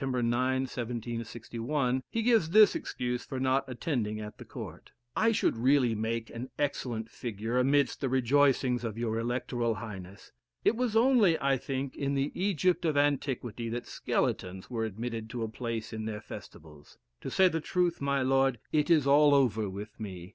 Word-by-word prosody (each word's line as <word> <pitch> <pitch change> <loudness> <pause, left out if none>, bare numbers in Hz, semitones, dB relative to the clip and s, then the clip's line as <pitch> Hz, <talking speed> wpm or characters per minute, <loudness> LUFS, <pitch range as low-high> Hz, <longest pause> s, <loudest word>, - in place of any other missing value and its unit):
9, 135 - -1
1761, 120 +1 -1
he 230 - -1
gives 225 -8 +3
this 210 +4 +7
excuse 125 0 -3
for 130 - -5
not 130 +1 +2
attending 120 -5 -2
at 105 0 -8
the - - -8
court: - - -9 0.3
"I 225 +1 +3
should 220 - +1
really 125 0 +3
make 110 +1 -2
an 125 +3 -6
excellent 120 -6 -2
figure 115 +1 -3
amidst 140 +2 +2
the 135 - 0
rejoicings 130 -1 +3
of 115 -2 -4
your 115 -1 -1
electoral 120 -1 -1
highness. 100 -4 -9 0.3
It - - +4
was 240 -2 -1
only, 225 -8 +5
I 135 0 +2
think, 135 +1 -4
in 140 0 -1
the 135 +1 0
Egypt 185 -2 +1
of 155 -3 +1
antiquity 130 -5 0
that 120 +1 -4
skeletons 95 +4 -2
were 115 -2 -1
admitted 110 +1 -5
to 120 0 -4
a - - -1
place 115 0 -4
in 110 0 -4
their 105 -1 -4
festivals. 75 -2 -12 0.2
To - - -4
say 190 - +5
the 165 -2 -1
truth, 175 -1 0
my 140 -1 +1
lord, 135 -1 +3
it 150 0 +1
is 155 -5 +5
all 145 +1 +6
over 110 -6 +2
with 105 +3 -8
me. 95 -4 -7
125 Hz, 170 wpm, -30 LUFS, 115-145 Hz, 0.3 s, this